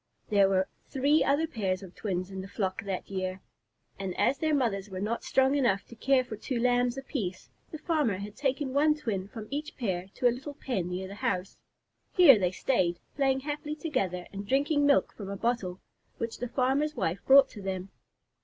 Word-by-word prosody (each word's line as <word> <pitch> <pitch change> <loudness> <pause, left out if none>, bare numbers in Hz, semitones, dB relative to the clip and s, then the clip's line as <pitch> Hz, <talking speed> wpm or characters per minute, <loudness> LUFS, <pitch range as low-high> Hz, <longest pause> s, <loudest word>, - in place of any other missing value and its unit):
There 200 -2 +5
were 190 -1 +2 0.2
three 280 +3 +3
other 285 +4 +2
pairs 195 -10 -2
of 185 -2 -11
twins 185 -2 -3
in 190 0 -5
the 190 - -8
flock 190 -2 -2
that 195 -2 -3
year, 185 -1 -3 0.6
and 190 -2 -4
as 275 - +2
their 315 -1 +1
mothers 210 -7 0
were 185 -1 -5
not 215 +4 -2
strong 265 +1 +3
enough 235 -9 +2
to 235 - -13
care 260 +2 +3
for 235 -3 -7
two 240 +3 -3
Lambs 245 +1 +2
apiece, 225 -9 -4 0.2
the 315 - -6
farmer 300 - 0
had 205 +2 -7
taken 270 0 -1
one 300 +2 +4
twin 200 -10 -3
from 215 +1 -8
each 300 +2 -4
pair 190 -7 -2
to 250 - +3
a 240 - +3
little 275 +4 -7
pen 195 - -2
near 185 +1 -4
the 195 - -8
house. 200 -5 -2 0.5
Here 295 - +8
they 180 -2 +1
stayed, 185 -4 0 0.2
playing 270 -1 +2
happily 295 +1 -4
together, 195 - -2
and 200 +1 -6
drinking 285 +3 +2
milk 280 - +3
from 200 -3 -8
a 200 - -4
bottle 195 -5 -1 0.4
which 230 0 -4
the 245 - -2
farmer's 275 +5 +1
wife 175 +3 -2
brought 270 0 +8
to 205 - -10
them. 190 0 -4
235 Hz, 200 wpm, -29 LUFS, 190-275 Hz, 0.6 s, Here